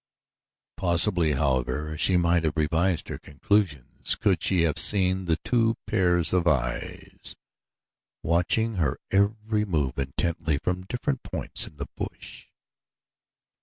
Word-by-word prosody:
Possibly, 85 -2 +2
however, 70 +2 -1
she 90 +4 +3
might 85 -1 +2
have 80 -1 -1
revised 80 +2 +1
her - - -5
conclusions 75 - -1
could - - +1
she 90 -3 +2
have 80 -3 +1
seen 95 -2 +2
the 80 -2 +1
two 115 -2 +2
pairs 90 -6 +2
of 90 -2 +2
eyes 60 -6 -3 0.9
watching 95 +7 +1
her 75 -7 0
every 105 +2 +1
move 75 -10 -1
intently 80 +3 -1
from 90 +4 -3
different 125 +3 -2
points - - -2
in 75 - -15
the 70 - -4
bush. - - -8
85 Hz, 125 wpm, -26 LUFS, 75-95 Hz, 0.9 s, she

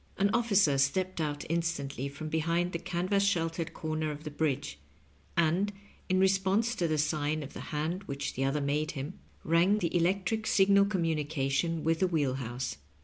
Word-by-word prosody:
An 200 +1 +2
officer 200 -11 +3
stepped 180 +6 +1
out 145 -2 -2
instantly 145 -5 -2
from 140 +3 -7
behind 165 +3 0
the 170 - -3
canvas 185 +4 0
sheltered 165 -3 0
comer 155 0 -2
of 150 0 -6
the 150 - -6
bridge, 140 - -2 0.6
and, 170 +5 +2 0.4
in 185 0 +3
response 195 +4 +2
to 175 -7 0
the 155 -1 0
sign 150 0 0
of 140 - -9
the - - -7
hand 160 +6 -2
which 140 -3 -4
the 135 - -2
other 135 +2 0
made 150 +2 0
him, 145 +5 -6 0.2
rang 170 +5 +3
the 175 -4 -1
electric 190 +5 +1
signal 200 0 +5
com 190 -4 0
munication 155 0 0
with 165 0 +1
the 185 - +3
wheel 150 -7 +1
house. 120 - -4
165 Hz, 175 wpm, -30 LUFS, 145-185 Hz, 0.6 s, signal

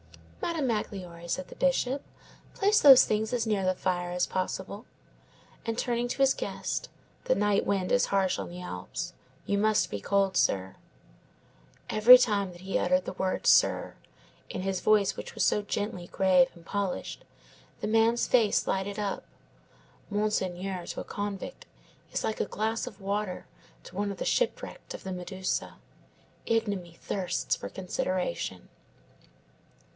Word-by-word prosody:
"Madame 330 -4 -1
Magloire," 185 -6 -4
said 180 +1 -2
the - - -12
Bishop, 270 0 +1 0.5
"place 415 +1 +3
those 270 -3 +9
things 215 0 0
as 235 -2 +1
near 205 -3 +1
the 185 0 +1
fire 180 -1 -1
as 180 0 +1
possible." 200 +3 -4 0.8
And 230 -1 -3
turning 240 0 0
to - - -3
his 270 -1 +4
guest: - - -4 0.4
"The - - +3
night 205 -1 +2
wind 190 -2 0
is 245 0 +4
harsh 195 -2 +1
on - - -5
the 175 +1 -8
Alps. 90 - -5 0.3
You 200 - 0
must 215 0 +2
be 100 - -4
cold, 195 - +1
sir." 95 -1 +1 1.2
Each 250 +4 +9
time 200 -4 -1
that 175 0 -13
he 195 +1 -1
uttered 180 +1 +2
the - - -4
word 185 0 -2
sir, - - +4 0.5
in 185 - -4
his 190 -1 -1
voice 205 -2 +3
which - - -8
was - - +2
so 210 - +2
gently 205 -3 -3
grave 185 -2 +4
and 170 -1 -16
polished, 200 -1 -3 0.6
the - - -3
man's 225 +2 +3
face 230 -5 +3
lighted 195 +2 -1
up. 205 -2 -2 0.9
Monsieur 190 -3 -1
to - - -4
a - - -9
convict 205 -1 -5 0.4
is - - -2
like 220 - -2
a - - +1
glass 220 +2 -2
of 200 - -9
water 200 -1 -3 0.4
to - - -13
one 200 +1 -1
of 195 - -7
the - - -4
shipwrecked - - -1
of - - -10
the 190 - -4
Medusa. 185 +1 -3 0.7
Ignominy 200 -7 -1
thirsts 185 0 -2
for - - -7
consideration. 185 - -3
200 Hz, 155 wpm, -29 LUFS, 185-220 Hz, 1.2 s, those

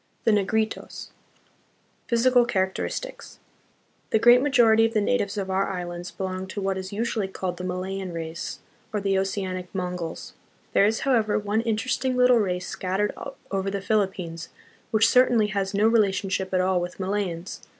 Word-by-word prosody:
The 225 - +4
Negritos. 215 +2 -1 1.0
Physical 245 +1 +4
Characteristics. 220 - -3 0.7
The - - +3
great 240 +3 +7
majority 235 -6 +5
of 225 0 +1
the - - +4
natives 205 -1 0
of 190 -1 -2
our 190 +1 +1
islands 175 -1 -5
belong 190 0 -4
to 190 - -5
what 195 -1 -1
is 190 0 -6
usually 220 -1 -1
called 185 -2 -4
the 180 - -6
Malayan 185 +1 -3
race, 165 0 -5 0.3
or 210 - -1
the 195 -1 +1
Oceanic 190 -2 -3
Mongols. 180 -3 -4 0.4
There 200 - +5
is, 220 +1 0
however, 230 -6 +2
one 210 +1 0
interesting 250 +3 -1
little 250 -1 +5
race 180 -3 -1
scattered 195 +3 -1 0.4
over 195 0 -1
the 200 0 -2
Philippines, 190 -5 -1 0.4
which 225 0 +4
certainly 235 -3 +4
has 195 -2 -1
no 210 +2 +4
relationship 195 -4 +1
at 185 -1 +2
all 185 -1 +1
with 175 +2 -6
Malayans. 190 -2 -3
195 Hz, 155 wpm, -25 LUFS, 185-220 Hz, 1.0 s, great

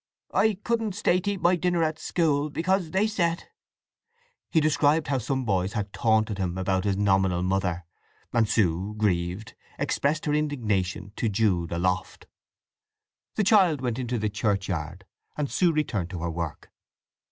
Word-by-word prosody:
"I 220 -1 +3
couldn't 225 -4 -1
stay 180 -3 +2
to 200 +2 -1
eat 195 - -7
my 175 +1 +5
dinner 175 -1 +1
in 155 0 0
school, 150 -4 0
because 180 +3 0
they 190 +5 +2
said—" 170 -6 -1 1.0
He 165 - +3
described 155 0 +2
how 135 -2 +1
some 130 +2 -2
boys 95 -2 0
had 105 -3 -3
taunted 110 -2 +1
him 90 -1 -2
about 95 +1 0
his 100 -1 +1
nominal 95 -3 +2
mother, 90 -2 -1 0.5
and 110 -2 +2
Sue, 95 +1 +1
grieved, 95 +1 -1 0.2
expressed 150 +2 0
her 150 - 0
indignation 105 -11 -1
to 115 - 0
Jude 95 -5 +1
aloft. 90 +2 -2 1.1
The 215 - +1
child 190 -7 +4
went 125 -1 -2
into 125 -1 -2
the 105 -1 0
churchyard, 95 -5 -2 0.3
and 145 -2 -2
Sue 180 -2 +3
returned 120 - -1
to 90 -4 -6
her 85 - -1
work. 80 -3 -5
110 Hz, 155 wpm, -26 LUFS, 95-155 Hz, 1.1 s, my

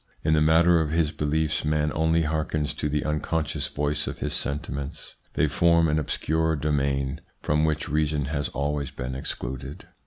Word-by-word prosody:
In 80 - +3
the 75 - +4
matter 80 +2 +5
of 80 - -1
his 80 -1 +1
beliefs 75 +1 0
man 75 0 +1
only 80 +1 +2
hearkens 75 -1 -1
to 75 - -2
the 75 0 -1
unconscious 75 +1 -1
voice 75 +1 -1
of - - -4
his - - -3
sentiments. 70 0 -4 0.2
They 75 - +3
form 85 +2 +4
an 75 0 +2
obscure 80 +2 0
domain" 70 -1 0 0.2
from 75 +1 +2
which 75 -1 0
reason 75 -1 0
has 70 +1 -2
always 70 0 -2
been 65 +1 -5
excluded. 65 +1 -5
75 Hz, 165 wpm, -26 LUFS, 70-80 Hz, 0.2 s, matter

